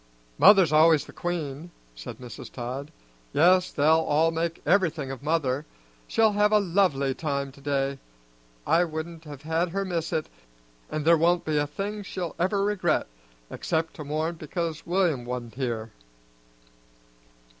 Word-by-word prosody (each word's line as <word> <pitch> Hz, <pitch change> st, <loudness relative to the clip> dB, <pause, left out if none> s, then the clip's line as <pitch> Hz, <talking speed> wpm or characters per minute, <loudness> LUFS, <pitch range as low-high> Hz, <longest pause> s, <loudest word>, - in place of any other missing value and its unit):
"Mother's 190 Hz, -7 st, +7 dB
always 155 Hz, -1 st, +5 dB
the -, -, -13 dB
queen," 165 Hz, -2 st, -4 dB, 0.2 s
said -, -, -9 dB
Mrs. 125 Hz, -3 st, -10 dB
Todd. 130 Hz, +4 st, -5 dB, 0.4 s
"Yes, 180 Hz, +4 st, +4 dB
they'll 155 Hz, +2 st, +4 dB
all 160 Hz, +1 st, +2 dB
make 165 Hz, 0 st, -2 dB
everything 165 Hz, -6 st, +1 dB
of 135 Hz, -, -7 dB
mother; 145 Hz, -3 st, 0 dB, 0.4 s
she'll 220 Hz, -1 st, +3 dB
have 210 Hz, +1 st, +2 dB
a 215 Hz, -, +6 dB
lovely 170 Hz, -8 st, +1 dB
time 140 Hz, -2 st, -3 dB
to 140 Hz, -, -17 dB
day. 140 Hz, -1 st, -1 dB, 0.7 s
I 170 Hz, -, +4 dB
wouldn't 160 Hz, 0 st, -6 dB
have 145 Hz, -2 st, -10 dB
had 165 Hz, +3 st, 0 dB
her 195 Hz, +3 st, -2 dB
miss 165 Hz, -3 st, -2 dB
it, 155 Hz, -, -1 dB, 0.6 s
and 155 Hz, -1 st, -3 dB
there 165 Hz, 0 st, +5 dB
won't 175 Hz, +2 st, +2 dB
be 155 Hz, -1 st, 0 dB
a 145 Hz, -, 0 dB
thing 200 Hz, +7 st, -4 dB
she'll 185 Hz, -4 st, -5 dB
ever 195 Hz, +3 st, +1 dB
regret, 190 Hz, -5 st, +1 dB, 0.5 s
except 165 Hz, 0 st, -2 dB
to 155 Hz, -, -6 dB
mourn 155 Hz, +3 st, -2 dB
because 160 Hz, 0 st, -4 dB
William 175 Hz, -8 st, +1 dB
wa'n't 120 Hz, -1 st, -5 dB
here." 115 Hz, -4 st, -3 dB
160 Hz, 150 wpm, -26 LUFS, 140-175 Hz, 0.7 s, Mother's